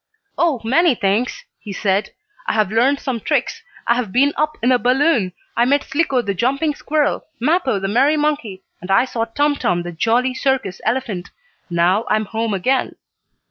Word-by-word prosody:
"Oh, 325 -7 +1
many 270 +6 +3
things," 210 +5 -1
he 210 - -9
said. 195 0 0 0.4
"I - - +1
have 210 -3 +1
learned 260 +6 +2
some 255 -4 -3
tricks, - - -1 0.2
I 235 - +4
have 240 -5 -2
been 280 +6 +3
up 305 0 -1
in 250 - +3
a 250 - +4
balloon, 250 - +2 0.2
I 235 - +3
met 280 +3 +2
Slicko 275 -3 0
the 200 -2 -2
jumping 275 - 0
squirrel, 295 0 -1
Mappo, 280 - +1
the 195 - -2
merry 270 +9 +3
monkey, 285 -11 -2 0.2
and 180 - -9
I 195 +6 +4
saw 230 -3 -2
Tum 290 +5 0
Tum, 175 -8 0
the 175 - -6
jolly 235 +9 +1
circus 260 -8 -1
elephant. 220 -7 -2 0.4
Now 175 +5 +2
I - - +3
am 215 0 -1
home 225 0 -2
again." 255 +8 0
245 Hz, 180 wpm, -19 LUFS, 205-280 Hz, 0.4 s, I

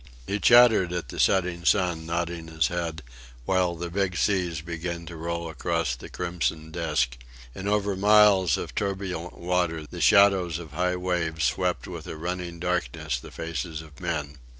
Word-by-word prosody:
He 100 +7 -2
chattered 115 -5 +6
at 90 -2 -4
the - - -7
setting 90 -3 +2
sun, 85 -4 +2
nodding 85 -1 -3
his 80 +1 0
head, 85 -3 -3 0.4
while 90 -1 +1
the 85 0 -5
big 95 -1 -1
seas 90 -6 0
began 85 +1 -5
to 85 0 -8
roll 85 +1 -3
across 85 -3 -1
the - - -11
crimson 85 -3 -3
disc; 75 -7 0 0.4
and 95 +6 -6
over 100 -1 +1
miles 100 -4 +5
of - - -6
turbulent 95 -3 -3
waters 85 -3 -1
the - - -6
shadows 95 -5 +5
of 85 -3 -9
high 90 +3 0
waves 85 -3 -1
swept 90 -1 0
with 85 -3 -8
a - - -6
running 85 +1 -4
darkness 85 -5 -2
the - - -11
faces 80 0 -5
of 75 -1 -16
men. 75 -5 -3
85 Hz, 165 wpm, -26 LUFS, 80-90 Hz, 0.4 s, chattered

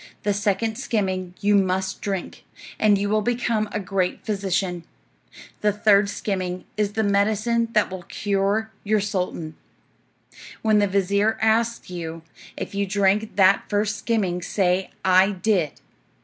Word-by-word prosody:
The 205 - +1
second 210 +3 -1
skimming 190 -7 -2
you 205 +1 +3
must 190 -1 +1
drink, 195 -3 -4 0.4
and 210 -2 +4
you 200 +1 -1
will 215 +1 +2
become 230 -2 0
a 210 - -2
great 190 -2 -2
physician. 190 -4 -1 0.8
The 210 - +2
third 205 -1 +3
skimming 185 -3 -3
is 210 -1 -1
the 220 - 0
medicine 215 +3 +1
that 210 -3 +2
will 185 -1 -6
cure 200 +4 -1
your 215 +1 +2
sultan. 180 -5 -3 1.1
When 215 -1 +4
the 205 - +3
vizir 200 +3 +1
asks 225 -1 +1
you 165 -2 -6 0.3
if - - -5
you 200 0 -1
drank 200 +2 +1
that 195 0 +4
first 210 0 0
skimming 200 -6 0
say, 185 0 0 0.2
'I 190 +2 +5
did.' 185 -9 +2
200 Hz, 140 wpm, -23 LUFS, 190-215 Hz, 1.1 s, I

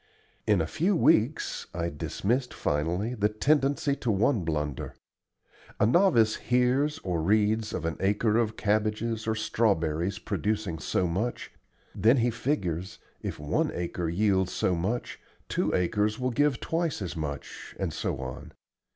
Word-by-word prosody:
In 105 -5 +4
a - - 0
few 180 - +1
weeks 150 -4 +2
I 85 -1 -1
dismissed 120 - -2
finally 85 +10 -1
the 105 -3 +1
tendency 140 +4 +1
to 125 - -3
one 110 +1 +2
blunder. 75 -4 -3 0.8
A - - +5
novice 115 - +4
hears 125 +5 +1
or 90 -3 -1
reads 105 +4 +2
of 85 - -3
an 80 -2 -2
acre 105 +3 +2
of 110 -2 -1
cabbages 110 +2 0
or 110 - +1
strawberries 95 -5 0
producing 105 -5 -2
so 90 - 0
much. 95 +8 -2 0.4
Then 115 +7 +4
he 120 0 +2
figures, 95 - -2 0.2
"if - - -4
one 75 0 0
acre 85 -1 -2
yields 95 +1 +2
so 90 - +1
much, 95 +8 -2 0.3
two - - 0
acres 105 +4 +1
will 125 0 -1
give 145 0 +2
twice 165 - -1
as 90 - -5
much," 75 -3 -6
and - - -2
so - - -2
on. 65 -1 -7
105 Hz, 145 wpm, -28 LUFS, 90-120 Hz, 0.8 s, A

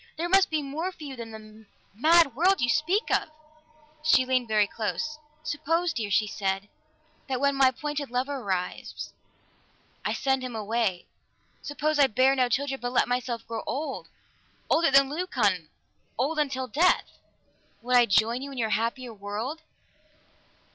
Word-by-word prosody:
"There 335 +2 -1
must 390 +1 +5
be 310 -2 -1
more 315 +7 -3
for 335 - -13
you 275 -2 -6
than 230 -2 -7
the 215 0 -13 0.3
mad 315 +4 +4
world 370 +7 +3
you 240 - +1
speak 330 - +1
of!" - - +1 0.7
She 315 -5 +4
leaned 255 -2 +1
very 215 -1 +3
close. 270 +9 -3 0.2
"Suppose, 320 +3 0
dear," 220 -4 -3
she 210 +2 +3
said, 195 0 -2 0.6
"that 260 -2 -1
when 280 +1 +2
my 270 -1 +5
appointed 295 +2 -3
lover 260 +3 -1
arrives, 190 -7 -4 0.9
I - - -1
send 265 -2 0
him 250 -2 -5
away. 215 -4 -1 0.6
Suppose 295 +1 -1
I 280 - +7
bear 260 +4 +3
no 255 -2 +2
child, 275 +3 0
but 245 0 -2
let 255 - +2
myself 245 -1 -2
grow 230 -1 -4
old, 300 +3 -4 0.6
older 330 +1 +4
than 275 0 +6
Leucon, 225 - 0 0.5
old 295 +6 0
until 265 -3 -1
death. 320 +10 +1 0.6
Would 250 +1 +1
I 240 -1 +6
join 220 +5 +2
you 280 +1 -6
in 270 - -9
your 220 -3 -1
happier 235 +2 -1
world?" 215 +9 -5
260 Hz, 160 wpm, -27 LUFS, 225-295 Hz, 0.9 s, I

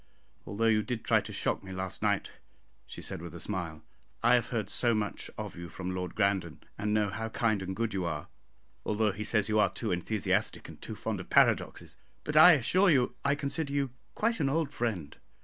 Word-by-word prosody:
Although 110 +3 -1
you 110 -1 +4
did 120 0 -4
try - - +4
to - - -8
shock - - -1
me 95 - -9
last 95 0 -4
night," - - 0 0.6
she - - -8
said, - - -5
with 85 0 -8
a - - -7
smile, 85 -6 -4 0.4
"I 120 - +6
have 120 -2 +3
heard 110 -5 -2
so 115 +4 +2
much 105 -1 -3
of - - -5
you 85 0 -8
from 95 +2 -5
Lord 90 -1 -4
Grandon, 100 -5 0
and 105 +1 -2
know 105 -1 +2
how 115 +2 -4
kind 110 -4 +1
and 95 0 -4
good 115 -1 -1
you 95 -2 -1
are, 75 -3 -3 0.6
although 105 0 +1
he 105 +2 -5
says 105 -2 +1
you 110 -1 +2
are 105 - +4
too 110 - -3
enthusiastic 95 +4 -1
and - - -12
too - - -6
fond - - -3
of - - -9
paradoxes, - - +2 0.3
but 150 - -4
I 160 +4 +10
assure 180 - +3
you 130 -6 +3
I 140 0 +2
consider 140 0 -2
you 140 -3 0 0.2
quite 230 +1 +1
an 140 - +2
old 155 0 0
friend. 95 -11 -3
110 Hz, 215 wpm, -30 LUFS, 95-125 Hz, 0.6 s, I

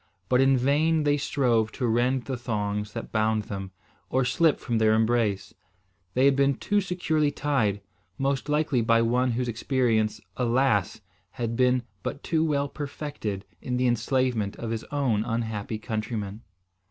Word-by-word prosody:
But 125 0 +4
in 135 0 +4
vain 150 +5 +2
they 145 0 +3
strove 120 -6 +1
to 125 - -2
rend 120 +2 +1
the 135 - -3
thongs 105 -3 -3
that 115 - -6
bound 110 0 +1
them, 100 -2 -6 0.4
or 130 0 +1
slip 160 +5 +2
from 115 -2 -1
their 110 0 +4
embrace. 110 -3 +1 0.6
They 130 +2 +4
had 140 -1 +5
been 140 0 +3
too 205 +9 0
securely 160 -5 0
tied, 130 -9 0 0.4
most 135 -1 -1
likely 150 -4 +2
by 115 0 +3
one 125 +2 +1
whose 125 +1 -1
experience, 115 -2 0 0.2
alas! 120 -4 +1 0.3
had 115 -1 -3
been 125 0 +3 0.2
but 140 - -5
too 160 -1 +1
well 145 -3 +1
perfected 140 -9 -5 0.2
in 125 -1 -2
the 125 - +1
enslavement 120 -3 0
of 115 -1 -5
his 115 -1 -3
own 130 -7 0
unhappy 110 -2 -3
countrymen. 110 -2 -4
125 Hz, 155 wpm, -26 LUFS, 110-140 Hz, 0.6 s, had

